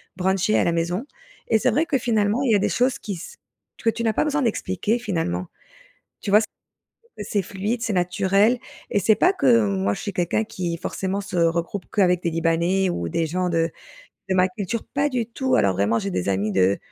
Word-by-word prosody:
bruncher 190 +3 +1
à - - +3
la - - +2
maison, 170 +7 -1 0.4
et 225 - +4
c'est - - +2
vrai 315 - +2
que, 320 -5 +1
finalement, 220 -1 +1
il 255 - +2
y - - +5
a - - +3
des - - +1
choses 250 +1 +1
qui 205 - -5
s 185 - -9 0.5
que 230 - +4
tu 230 +1 -2
n'as 225 -1 +2
pas - - +1
besoin 295 -2 0
d'expliquer 210 -1 0
finalement. 165 - -2 0.7
Tu 200 - -4
vois 205 - +7
s 220 - +1 0.7
c'est 210 - -4
c'est 200 0 0
fluide 205 +5 -3
c'est 225 - -1
naturel, 195 +5 +2 0.3
et - - +2
c'est 215 +2 +4
pas 360 - +3
que 115 - +4
moi 100 0 0
je - - -7
suis 200 - -4
quelqu'un 175 +5 0
qui 180 -6 -4
forcément 190 +3 -3
se 200 -2 -6
regroupe 170 +3 0
qu'avec 180 -3 +3
des 170 - 0
libanais 170 +3 +1
ou 85 - -3
des 165 - 0
gens 180 +3 -1
de 165 0 +1 0.6
de 190 - +1
ma 185 0 +4
culture. 200 +4 -4
Pas 285 +1 -1
du 245 -5 -1
tout 260 +3 -1
alors 95 -1 +3
vraiment 100 +4 +1
j'ai 100 -1 -3
des 90 +1 -2
amis 100 +2 0
de 95 0 +2
190 Hz, 220 wpm, -23 LUFS, 165-220 Hz, 0.7 s, vois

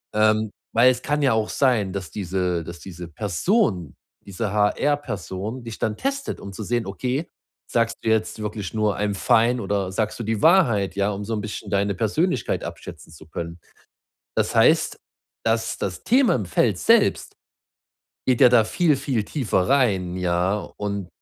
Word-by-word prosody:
Ähm, 110 0 +3 0.2
weil, 125 +3 +7
es 125 0 -4
kann 150 +2 -1
ja 130 -5 +3
auch 110 -1 0
sein, 115 -8 +1
dass 95 -4 -5
diese 90 -3 -2
dass 85 +1 -9
diese 85 -2 -9
Person, 95 - 0 0.3
diese 100 +1 -3
HR-Person 105 - -1
dich 115 -2 -8
dann 105 -1 -1
testet, 275 0 -3
um 100 - -8
zu 100 +3 -7
sehen: 120 0 -1
Okay, 125 - -3 0.4
sagst 115 -1 +1
du 110 - 0
jetzt 110 0 0
wirklich 105 -2 -5
nur, 105 -2 0
„I'm 105 0 -1
fine,“ 115 +5 +3
oder 100 -2 -1
sagst 110 +3 -2
du - - -3
die 110 -1 -2
Wahrheit, 115 - +4
ja, 100 +1 +1
um 100 +1 -5
so 115 - -3
'n 105 - -3
bisschen 105 0 -6
deine 100 -1 0
Persönlichkeit 125 - 0
abschätzen - - -9
zu 80 0 -14
können. 85 +1 -6 0.8
Das - - 0
heißt, - - +4 0.5
dass 115 0 0
das 95 -2 -4
Thema 255 - +4
im 105 -6 -3
Feld 85 - +1
selbst - - +3 0.9
geht 125 -2 +3
ja 125 - +9
da 120 -2 +5
viel, 155 +7 +2
viel 125 -6 -1
tiefer 105 -10 0
rein, 95 -10 +2
ja? 90 +2 0 0.2
Und 100 -3 -4
105 Hz, 170 wpm, -23 LUFS, 95-120 Hz, 0.9 s, ja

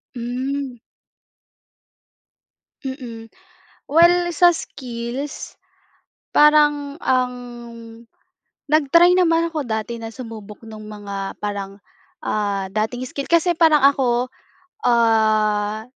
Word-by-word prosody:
Hmm. 255 +3 -3 2.1
Mm. 245 -4 -7 0.6
Well 345 +3 +5
sa 345 +1 +5
skills, 255 -2 -6 0.7
parang 295 0 +3
ang 255 -1 +1 1.4
nag-try 335 +4 +5
naman 335 -2 +3
ako 310 -4 -4
dati 220 0 -3
na 225 0 -8
sumubok 220 -4 -9
nung 215 -1 -10
mga 200 -2 -7
parang, 200 -1 -5 0.4
ah, 200 -2 -2
dating 215 +5 -2
skill. 280 - -5
Kasi 340 +1 +2
parang 315 -3 +5
ako, 255 -3 +2 0.6
ah, 215 -2 +2
245 Hz, 85 wpm, -21 LUFS, 215-295 Hz, 2.1 s, Well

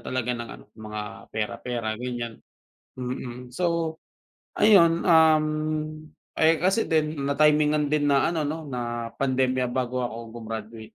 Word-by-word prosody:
talaga 125 -1 -2
ng 120 -1 -5
ano, - - -11 0.2
mga 105 -1 -5 0.3
pera-pera, 115 +1 -3
ganyan, 120 -2 -5 0.6
mm. 125 -1 -6
So, 170 -1 0 0.6
ayun, 170 -6 +5
um, 160 -3 +6 1.0
eh, 160 +1 +5
kasi 190 +7 +1
din 155 -3 0
natimingan 150 0 +3
din 145 -1 +2
na 140 +3 +3
ano 165 - -1
'no, 160 +1 -4
na 120 -4 -4
pandemya 130 -1 +1
bago 125 0 -2
ako 115 -2 -5
gumraduate. 110 0 -6
130 Hz, 125 wpm, -25 LUFS, 120-155 Hz, 1.0 s, um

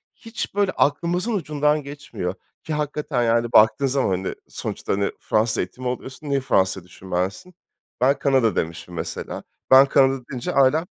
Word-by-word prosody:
hiç 225 -3 -6
böyle 200 -2 +2
aklımızın 175 +10 0
ucundan 150 -5 0
geçmiyor 135 -10 -5 0.3
ki 160 - -4
hakikaten, 150 -3 -1
yani, 115 0 +1
baktığın 110 +5 +5
zaman, 135 -2 +1
hani, 95 0 -1
sonuçta, - - -4
hani, 100 0 0
Fransız 110 +1 +1
eğitimi 130 0 -4
alıyorsun, 130 +4 -5
niye 140 -1 +2
Fransa'yı 95 -7 +1
düşünmezsin? 95 - -4 0.5
Ben 135 +2 +3
Kanada 130 -7 +2
demişim 85 +2 -3
mesela. 85 - -5 0.3
Ben 135 +1 +9
Kanada 135 -1 +3
deyince 125 -3 -3
ailem 140 +5 +4
130 Hz, 145 wpm, -23 LUFS, 110-150 Hz, 0.5 s, Ben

